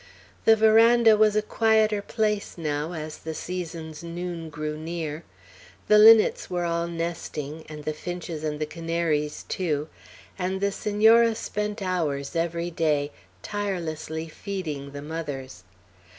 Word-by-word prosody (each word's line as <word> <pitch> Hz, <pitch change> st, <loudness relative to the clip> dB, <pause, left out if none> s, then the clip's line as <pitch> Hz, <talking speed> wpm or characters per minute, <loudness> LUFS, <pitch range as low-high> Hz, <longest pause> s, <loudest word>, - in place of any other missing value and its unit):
The 225 Hz, -, +7 dB
veranda 225 Hz, +1 st, +6 dB
was 215 Hz, 0 st, +4 dB
a 215 Hz, -, +2 dB
quieter 220 Hz, -1 st, +2 dB
place 210 Hz, -2 st, -1 dB
now 150 Hz, 0 st, -2 dB
as 155 Hz, -2 st, -6 dB
the 160 Hz, 0 st, -6 dB
season's 165 Hz, -3 st, -6 dB
noon 170 Hz, -1 st, -5 dB
grew 150 Hz, 0 st, -4 dB
near. 160 Hz, 0 st, -5 dB, 0.7 s
The 210 Hz, 0 st, +7 dB
linnets 220 Hz, 0 st, +7 dB
were 175 Hz, -1 st, -1 dB
all 170 Hz, 0 st, -1 dB
nesting, 165 Hz, -3 st, -4 dB
and 150 Hz, -1 st, -8 dB
the 155 Hz, -, -2 dB
finches 170 Hz, -1 st, -6 dB
and 150 Hz, -1 st, -2 dB
the 155 Hz, -, 0 dB
canaries 165 Hz, -2 st, -2 dB
too; 155 Hz, -4 st, -2 dB, 0.5 s
and 190 Hz, +1 st, -1 dB
the 200 Hz, +1 st, +1 dB
Senora 220 Hz, +3 st, +4 dB
spent 210 Hz, -1 st, -3 dB
hours, 160 Hz, -6 st, -2 dB
every 170 Hz, +1 st, -1 dB
day, 150 Hz, -3 st, 0 dB, 0.3 s
tirelessly 165 Hz, -5 st, -3 dB
feeding 155 Hz, -5 st, -5 dB
the 140 Hz, 0 st, -7 dB
mothers. 145 Hz, -, -6 dB
170 Hz, 135 wpm, -26 LUFS, 155-205 Hz, 0.7 s, The